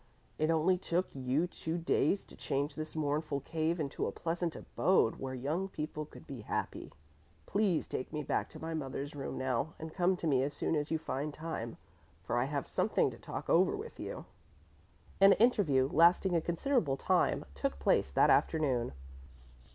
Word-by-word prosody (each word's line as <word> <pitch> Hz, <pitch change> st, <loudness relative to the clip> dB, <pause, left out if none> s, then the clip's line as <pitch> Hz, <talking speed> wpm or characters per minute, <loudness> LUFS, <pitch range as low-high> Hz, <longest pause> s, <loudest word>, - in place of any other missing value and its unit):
"It 155 Hz, +1 st, +2 dB
only 165 Hz, +3 st, +3 dB
took 180 Hz, 0 st, -1 dB
you 135 Hz, +4 st, 0 dB
two 165 Hz, -1 st, -4 dB
days 175 Hz, +3 st, +1 dB
to -, -, -13 dB
change 140 Hz, +1 st, -2 dB
this 155 Hz, 0 st, -5 dB
mournful 150 Hz, -1 st, -1 dB
cave 160 Hz, +3 st, -1 dB
into 145 Hz, -2 st, -2 dB
a -, -, -2 dB
pleasant 170 Hz, 0 st, -2 dB
abode 185 Hz, -11 st, +2 dB
where 130 Hz, -1 st, -4 dB
young 150 Hz, +9 st, -1 dB
people 155 Hz, -3 st, -5 dB
could -, -, -14 dB
be 135 Hz, -5 st, -7 dB
happy. -, -, -4 dB, 0.5 s
Please 200 Hz, -5 st, +1 dB
take 130 Hz, -, -4 dB
me 150 Hz, -1 st, -3 dB
back -, -, -1 dB
to -, -, -10 dB
my 165 Hz, 0 st, -4 dB
mother's 140 Hz, -1 st, -4 dB
room 140 Hz, -, -4 dB
now 130 Hz, +3 st, -1 dB
and 160 Hz, 0 st, -7 dB
come 185 Hz, 0 st, +2 dB
to 175 Hz, -, -5 dB
me 135 Hz, -5 st, +3 dB
as 140 Hz, +2 st, -2 dB
soon 165 Hz, -, 0 dB
as 150 Hz, 0 st, -1 dB
you 160 Hz, -, +1 dB
find 150 Hz, -1 st, -4 dB
time, 155 Hz, -8 st, -5 dB, 0.5 s
for 95 Hz, -, -2 dB
I 120 Hz, -, +2 dB
have 140 Hz, -1 st, -2 dB
something -, -, +1 dB
to -, -, -12 dB
talk -, -, -6 dB
over 185 Hz, -, +4 dB
with 445 Hz, +3 st, -8 dB
you." -, -, -6 dB, 0.9 s
An 195 Hz, 0 st, +8 dB
interview 190 Hz, -, +3 dB
lasting 175 Hz, +3 st, +5 dB
a 165 Hz, -, +3 dB
considerable 170 Hz, -, 0 dB
time -, -, +2 dB
took 70 Hz, 0 st, -2 dB
place 65 Hz, -1 st, +2 dB
that 70 Hz, -, +4 dB
afternoon. 130 Hz, -, +2 dB
155 Hz, 180 wpm, -33 LUFS, 135-170 Hz, 0.9 s, An